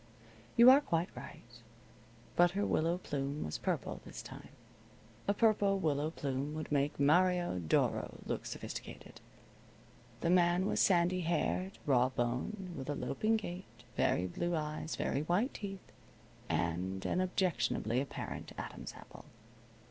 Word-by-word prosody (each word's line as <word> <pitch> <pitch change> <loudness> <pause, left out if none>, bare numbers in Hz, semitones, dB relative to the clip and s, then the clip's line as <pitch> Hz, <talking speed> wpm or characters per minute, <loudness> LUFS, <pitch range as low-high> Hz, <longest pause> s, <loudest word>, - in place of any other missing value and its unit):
You 240 +2 +10
are 275 +2 +7
quite 170 - -1
right. 120 0 -11 0.7
But 175 0 +6
her 205 - +2
willow 165 +2 +1
plume 145 -4 -3
was 75 - -4
purple - - -2
this - - -8
time. - - -10 0.8
A 200 - +3
purple 205 -3 +3
willow 150 -4 0
plume 140 -1 -3
would 155 -1 -5
make 145 0 +1
Mario 175 - +3
Doro 80 -3 0
look - - -3
sophisticated. - - -7 1.0
The 170 - +2
man 175 0 +4
was - - 0
sandy 180 0 +4
haired, 175 +3 -1
raw 130 -3 +4
boned, 130 - -2
with 135 0 -6
a 145 - 0
loping 215 +13 0
gait, 175 - -8
very 90 - +2
blue 175 - -2
eyes, 155 0 -3
very 140 - -1
white 180 - +1
teeth, 195 -2 -7 0.6
and 95 +3 -1
an 185 - +1
objectionably 135 - 0
apparent 140 - -6
Adam's - - -6
apple. - - -13
165 Hz, 135 wpm, -34 LUFS, 135-185 Hz, 1.0 s, You